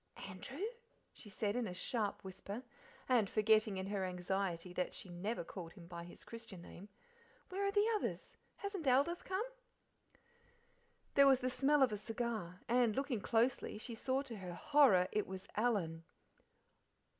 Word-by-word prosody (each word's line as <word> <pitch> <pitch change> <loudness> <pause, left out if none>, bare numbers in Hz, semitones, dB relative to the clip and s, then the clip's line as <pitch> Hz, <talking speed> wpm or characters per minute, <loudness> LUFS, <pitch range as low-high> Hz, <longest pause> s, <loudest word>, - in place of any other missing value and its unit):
"Andrew!" 265 - -5 0.5
she 210 - -11
said 205 +1 -1
in 245 -2 0
a 180 - -5
sharp 210 +2 -1
whisper, 200 +5 -6 0.4
and 235 -6 +4
forgetting 215 -1 +4
in 190 - -2
her 200 -1 -1
anxiety 180 -1 -2
that 180 - -1
she 185 - -7
never 180 +5 -3
called 170 -1 -8
him 180 -5 -12
by 170 0 -7
his 175 - -11
Christian 230 -5 -8
name 195 +3 -11 0.6
"where 385 +2 -2
are - - +2
the 410 +1 +4
others? 420 - -3 0.2
Hasn't 400 -7 -4
Aldith 280 +7 +3
come?" 385 +4 -1 1.7
There 280 0 +7
was 265 -1 +6
the 255 0 0
smell 280 +2 +4
of 255 - +4
a - - -1
cigar, 220 -5 -3
and, 235 -2 +3
looking 270 -6 -1
closely, 230 +2 +1
she 230 +2 -4
saw 260 +4 0
to 240 -5 -7
her 180 -3 -6
horror 255 - +5
it 210 - 0
was 190 0 -6
Alan. 195 -8 +1
215 Hz, 160 wpm, -37 LUFS, 185-260 Hz, 1.7 s, There